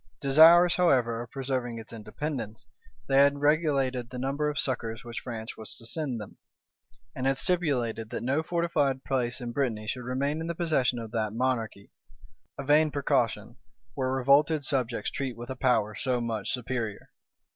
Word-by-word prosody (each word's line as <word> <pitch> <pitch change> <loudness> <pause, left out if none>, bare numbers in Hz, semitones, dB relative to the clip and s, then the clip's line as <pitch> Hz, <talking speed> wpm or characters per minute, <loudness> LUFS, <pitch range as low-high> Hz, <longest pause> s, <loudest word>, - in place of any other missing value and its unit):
Desirous, 165 +5 +7
however, 125 -10 +2
of 120 - -8
preserving 130 -3 -3
its 115 +1 -10
independency, 110 0 -5 0.4
they 135 - +2
had 140 +1 +5
regulated 140 -5 +1
the 130 - -7
number 140 +4 -1
of 145 - -4
succors 115 -4 -2
which 120 -1 -6
France 115 -2 -7
was 110 - -3
to 115 - -12
send 125 0 -3
them, 105 - -10 0.8
and 130 +1 -1
had 135 0 +2
stipulated 130 - 0
that - - -4
no 135 +5 +1
fortified 160 -6 0
place 125 -2 -1
in 120 -2 -5
Brittany 120 -5 -1
should 125 +3 -3
remain 140 +5 -1
in 165 - -4
the 170 - -3
possession 155 -7 +1
of 115 -2 -6
that 110 -3 -1
monarchy; 115 -4 -2 0.7
a 140 - -4
vain 150 +3 +4
precaution, 120 -5 -1 0.4
where 130 +1 -1
revolted 140 +3 +3
subjects 125 -6 -1
treat 130 -4 -4
with 120 +2 -7
a - - -4
power 120 -5 +1
so 125 +2 -1
much 115 -3 -3
superior! 120 -4 -4
130 Hz, 165 wpm, -28 LUFS, 115-140 Hz, 0.8 s, Desirous